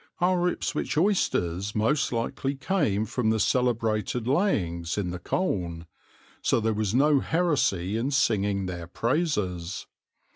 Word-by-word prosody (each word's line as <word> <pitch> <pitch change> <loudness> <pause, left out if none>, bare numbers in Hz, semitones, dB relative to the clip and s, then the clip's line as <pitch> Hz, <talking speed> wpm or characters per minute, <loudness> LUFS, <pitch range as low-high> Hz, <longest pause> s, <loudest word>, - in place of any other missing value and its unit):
Our 180 0 +2
Ipswich 150 -5 -2
oysters 105 - +1
most 125 +7 +1
likely 125 +4 -2
came 135 - 0
from 110 0 -1
the 110 0 +2
celebrated 115 -1 0
layings 90 - 0
in 95 -4 -1
the 90 - -5
Colne, 85 - -2 0.6
so - - +2
there 110 0 0
was 105 0 -1
no 145 +2 +4
heresy 130 - +1
in 120 +4 -1
singing 100 -8 +1
their 85 -2 -5
praises. 100 - -1
115 Hz, 130 wpm, -27 LUFS, 95-145 Hz, 0.6 s, no